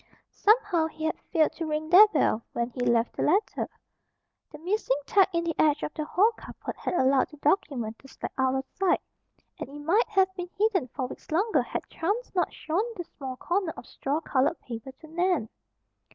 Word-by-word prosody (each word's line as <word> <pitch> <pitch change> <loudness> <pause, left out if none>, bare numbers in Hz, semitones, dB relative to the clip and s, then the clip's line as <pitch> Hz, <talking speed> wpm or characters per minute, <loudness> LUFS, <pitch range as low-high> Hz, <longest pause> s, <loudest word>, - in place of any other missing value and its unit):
Somehow 415 -7 +3
he 315 0 -9
had 320 - -1
failed 315 -3 +1
to 330 - -3
ring 310 0 -2
their 390 +5 +9
bell 295 - +1
when 235 +1 -2
he 250 - -10
left 235 -1 +2
the - - -3
letter. 390 +8 +1 0.8
The 300 - -9
missing 345 -4 0
tack 390 +3 +4
in 335 -1 0
the 335 -1 -1
edge 300 -1 +3
of - - -3
the 305 - -3
hall 405 +8 +3
carpet - - -8
had - - -3
allowed 265 -4 +3
the 300 - -14
document 275 - 0
to 270 - -15
slide - - -7
out 260 -1 +1
of 265 0 -2
sight, 385 -1 +2 0.6
and - - -5
it 290 +1 -9
might 365 +11 +2
have 380 -3 +3
been 360 -1 -6
hidden 405 - +2
for 255 +1 -4
weeks 250 - -10
longer 395 +8 +2
had - - -5
chance 415 +9 -2
not 360 - +1
shown 330 +5 -1
the 355 - -4
small 270 -6 -7
corner 355 +1 -1
of - - -9
straw 280 +6 -2
colored 270 -4 +1
paper 235 +2 -7
to 290 +4 -16
Nan. 345 - 0
315 Hz, 200 wpm, -27 LUFS, 270-375 Hz, 0.8 s, their